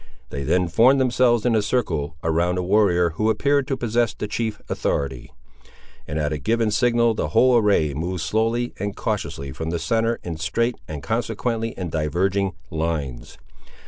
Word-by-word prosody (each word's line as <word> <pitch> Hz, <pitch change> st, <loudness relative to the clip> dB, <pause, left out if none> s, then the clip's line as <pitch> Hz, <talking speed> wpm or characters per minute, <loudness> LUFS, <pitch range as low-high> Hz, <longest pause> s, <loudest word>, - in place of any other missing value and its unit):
They 70 Hz, -, -4 dB
then 90 Hz, +6 st, +1 dB
formed 120 Hz, +10 st, +4 dB
themselves 120 Hz, -3 st, +3 dB
in 120 Hz, -, +3 dB
a 110 Hz, -, +3 dB
circle 100 Hz, -, -1 dB
around 85 Hz, +2 st, +1 dB
a 90 Hz, -, -1 dB
warrior, 90 Hz, -3 st, +3 dB
who 110 Hz, +7 st, 0 dB
appeared 140 Hz, +4 st, +2 dB
to 135 Hz, -3 st, -1 dB
possess 120 Hz, -1 st, 0 dB
the 105 Hz, -, -4 dB
chief 110 Hz, 0 st, -3 dB
authority; 70 Hz, -3 st, -2 dB, 0.8 s
and 75 Hz, -, -3 dB
at 75 Hz, 0 st, 0 dB
a 75 Hz, -, -3 dB
given 115 Hz, -, +1 dB
signal 120 Hz, 0 st, +3 dB
the 110 Hz, -, -2 dB
whole 125 Hz, +2 st, +4 dB
array 100 Hz, -10 st, +3 dB
moved 85 Hz, +4 st, -3 dB
slowly 115 Hz, +7 st, 0 dB
and 100 Hz, 0 st, -3 dB
cautiously 70 Hz, 0 st, -3 dB
from 80 Hz, +4 st, -5 dB
the 85 Hz, -, -1 dB
centre 115 Hz, +7 st, 0 dB
in 85 Hz, -2 st, -5 dB
straight 115 Hz, +10 st, -1 dB
and 75 Hz, -2 st, -6 dB
consequently 115 Hz, 0 st, -2 dB
in 90 Hz, -4 st, -4 dB
diverging 95 Hz, +5 st, 0 dB, 0.2 s
lines. 80 Hz, -7 st, -3 dB
100 Hz, 170 wpm, -23 LUFS, 80-115 Hz, 0.8 s, formed